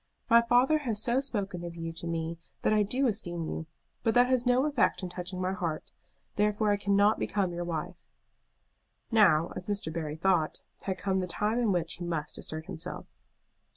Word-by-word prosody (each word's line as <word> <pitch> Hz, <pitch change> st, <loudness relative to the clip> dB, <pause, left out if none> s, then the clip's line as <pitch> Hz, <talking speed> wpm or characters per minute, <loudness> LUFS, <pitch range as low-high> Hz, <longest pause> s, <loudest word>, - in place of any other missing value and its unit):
My 235 Hz, 0 st, +8 dB
father 245 Hz, +6 st, +4 dB
has 235 Hz, -8 st, -2 dB
so 240 Hz, +4 st, +2 dB
spoken 200 Hz, -9 st, -2 dB
of 170 Hz, -1 st, -6 dB
you 165 Hz, -1 st, -5 dB
to 170 Hz, +1 st, -6 dB
me 165 Hz, 0 st, -3 dB, 0.2 s
that -, -, +3 dB
I 215 Hz, -, +4 dB
do 250 Hz, +7 st, +1 dB
esteem 175 Hz, -8 st, -1 dB
you; 160 Hz, 0 st, -4 dB, 0.3 s
but 225 Hz, 0 st, +1 dB
that 245 Hz, 0 st, +7 dB
has 250 Hz, -1 st, +1 dB
no 250 Hz, +2 st, +4 dB
effect 285 Hz, -8 st, +1 dB
in 180 Hz, -, -3 dB
touching 180 Hz, +1 st, -5 dB
my 185 Hz, +1 st, 0 dB
heart, 170 Hz, -4 st, -4 dB, 0.5 s
therefore 210 Hz, 0 st, +2 dB
I 205 Hz, -, +2 dB
cannot 200 Hz, +1 st, +3 dB
become 190 Hz, -3 st, 0 dB
your 175 Hz, 0 st, -3 dB
wife." 165 Hz, -3 st, -4 dB, 1.1 s
Now, 175 Hz, -8 st, +5 dB
as 180 Hz, -, -7 dB
Mr. 200 Hz, -6 st, -2 dB
Barry 155 Hz, -2 st, -3 dB
thought, 170 Hz, -2 st, +1 dB, 0.2 s
had 190 Hz, -1 st, -1 dB
come 190 Hz, 0 st, 0 dB
the 185 Hz, -, -2 dB
time 210 Hz, +6 st, 0 dB
in 230 Hz, -4 st, +2 dB
which 170 Hz, -3 st, 0 dB
he 175 Hz, -, -6 dB
must 165 Hz, -3 st, -3 dB
assert 155 Hz, 0 st, -5 dB
himself. 175 Hz, -4 st, -6 dB
190 Hz, 190 wpm, -29 LUFS, 170-220 Hz, 1.1 s, My